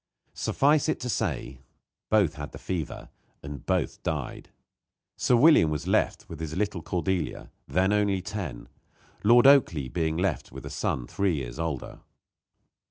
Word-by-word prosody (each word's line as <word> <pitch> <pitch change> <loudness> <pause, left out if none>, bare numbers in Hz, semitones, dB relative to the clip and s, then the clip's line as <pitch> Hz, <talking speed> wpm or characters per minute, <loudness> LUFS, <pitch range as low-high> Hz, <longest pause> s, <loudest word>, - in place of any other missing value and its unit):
Suffice 150 +2 +2
it 155 - 0
to 125 - -3
say, 65 - -2 0.5
both 100 -8 +3
had 75 -1 -8
the - - -7
fever, 85 -5 -5 0.3
and 70 -2 -7
both - - 0
died. - - -4 0.7
Sir 125 - +2
William 125 - +6
was 75 -1 -3
left - - +1
with 80 - -9
his 80 0 -4
little 100 -3 -1
Cordelia, 90 +1 -2 0.2
then 95 +3 +2
only 100 -2 +2
ten; 90 - -6 0.6
Lord 120 +4 +6
Oakleigh 85 - +5
being 80 -2 0
left 95 +3 -1
with - - -9
a - - -7
son - - -2
three 95 +5 0
years 65 0 -5
older. 80 -6 -4
90 Hz, 150 wpm, -27 LUFS, 75-105 Hz, 0.7 s, William